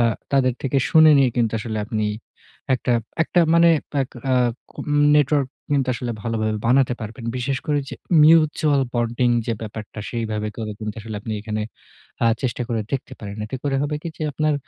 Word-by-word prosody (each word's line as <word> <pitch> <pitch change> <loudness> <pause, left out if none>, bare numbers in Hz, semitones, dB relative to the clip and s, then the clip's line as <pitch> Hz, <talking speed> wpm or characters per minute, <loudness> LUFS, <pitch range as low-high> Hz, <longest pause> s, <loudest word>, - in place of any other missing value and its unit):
আ - - +5 0.3
তাদের 130 -3 +3
থেকে 135 0 +1
শুনে 155 -1 +7
নিয়ে 130 -3 +4
কিন্তু 115 -2 +1
আসলে 110 -1 -4
আপনি 110 -1 -1 0.7
একটা 125 0 -1 0.3
একটা 175 - +2
মানে 170 0 +6 0.3
আ - - +4 0.3
আ - - +4 0.8
নেটওয়ার্ক 145 -2 +2 0.2
কিন্তু 135 -2 +1
আসলে 125 -1 -4
ভালোভাবে 110 -2 -1
বানাতে 125 0 +3
পারবেন। 110 +2 -7
বিশেষ 130 +1 -1
করে 145 -1 +1
এই 135 - -13
যে - - -7 0.3
মিউচুয়াল 155 -2 +4
বন্ডিং 120 +1 +1 0.2
যে 115 - 0
ব্যাপারটা 105 0 -7
সেইভাবে 110 -2 -2
করে 110 -1 -4
কিন্তু 105 0 -5 0.2
আপনি 110 - -5
এখানে 110 0 -3 0.6
আ - - +5 0.2
চেষ্টা 125 -1 -1
করে 115 -2 -1
দেখতে 135 0 -3
পারেন। 100 0 -7
এতে 130 - -5
করে 135 -1 +1
হবে 145 +1 -1
কি 170 - -4
যে - - -4
আপনার 155 +1 +1
125 Hz, 175 wpm, -22 LUFS, 110-140 Hz, 0.8 s, শুনে